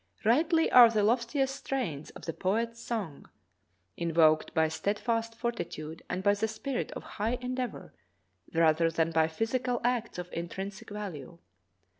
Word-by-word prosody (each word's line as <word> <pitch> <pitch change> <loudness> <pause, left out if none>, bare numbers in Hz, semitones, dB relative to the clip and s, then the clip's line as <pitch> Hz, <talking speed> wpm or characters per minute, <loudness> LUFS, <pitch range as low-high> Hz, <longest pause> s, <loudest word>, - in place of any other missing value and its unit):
Rightly 320 +8 +3
are 245 -2 +10
the 215 -2 +1
loftiest 255 +5 +1
strains 215 - -3
of - - -11
the 165 - -3
poet's 230 +7 -1
songs 205 -13 -4 0.7
invoked 160 -2 +3
by 160 0 +4
steadfast 225 +7 -1
fortitude 165 -10 -4
and 185 +1 -2
by 200 0 +5
the 205 +2 0
spirit 240 +4 -3
of - - -7 0.2
high 230 +4 +1
endeavor 250 -1 -4 0.6
rather 165 0 +3
than 165 0 0
by 160 -1 +3
physical 240 +8 -1
acts 240 -3 0
of 180 0 -7
intrinsic 190 +4 -5
value. 180 -8 -7
210 Hz, 140 wpm, -30 LUFS, 165-240 Hz, 0.7 s, are